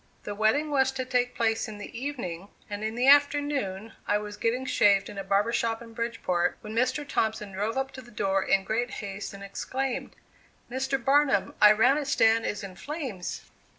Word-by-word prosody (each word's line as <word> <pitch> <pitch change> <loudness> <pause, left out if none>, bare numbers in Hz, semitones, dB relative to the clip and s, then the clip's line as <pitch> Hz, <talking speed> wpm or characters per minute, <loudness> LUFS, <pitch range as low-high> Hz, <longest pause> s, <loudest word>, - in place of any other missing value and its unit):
The 205 - -4
wedding 220 +9 +1
was 265 -2 +3
to 260 -1 -3
take 250 -1 0
place 225 -1 +1
in 215 -1 -8
the 205 - -9
evening, 230 -9 -5 0.2
and 205 0 -5
in 220 +1 -2
the 250 +2 +1
afternoon 285 -8 +3
I 205 - +3
was 210 0 -6
getting 240 +4 -1
shaved 200 -5 +3
in 200 - -7
a - - -3
barber 200 +4 +1
shop 225 -1 0
in 230 -1 -12
Bridgeport, 225 -7 -1
when 215 -1 -7
Mr. 255 +5 0
Thompson 220 -5 -1
drove 210 +5 -2
up 265 0 -1
to 260 - -9
the 240 - -16
door 195 -4 0
in 195 0 +2
great 235 +4 -1
haste 200 -3 -6
and 200 0 -10
exclaimed: 260 +6 -3 0.6
"Mr. 265 +1 0
Barnum, 270 -4 +2
Iranistan 225 +1 +5
is 205 - -3
in 190 -2 -8
flames!" 260 - -5
225 Hz, 185 wpm, -27 LUFS, 205-265 Hz, 0.6 s, Iranistan